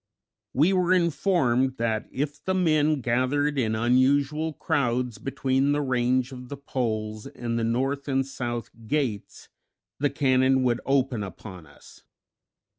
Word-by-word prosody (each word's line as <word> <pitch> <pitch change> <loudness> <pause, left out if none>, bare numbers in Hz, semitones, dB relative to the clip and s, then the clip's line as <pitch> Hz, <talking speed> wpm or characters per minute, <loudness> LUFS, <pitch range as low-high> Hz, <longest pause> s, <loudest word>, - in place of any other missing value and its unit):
We 155 +9 +3
were 185 -1 +3
informed 150 -8 +2
that 110 -2 -1
if 145 +1 -4
the 190 - 0
men 155 -5 +2
gathered 135 +4 +1
in 110 -3 0
unusual 140 +6 +2
crowds 125 - -1
between 135 +3 0
the 145 - 0
range 130 0 +1
of 125 -1 -9
the 140 - -6
poles 110 -6 -3
and 115 -1 -3
the - - -1
north 135 +5 -1
and 135 -1 +1
south 120 -3 -5 0.2
gates, 125 -7 -3 0.5
the 145 +1 +2
cannon 130 -1 +2
would 120 -1 +1
open 135 -4 +1
upon 95 -3 -9
us. - - -17
130 Hz, 135 wpm, -26 LUFS, 120-145 Hz, 0.5 s, We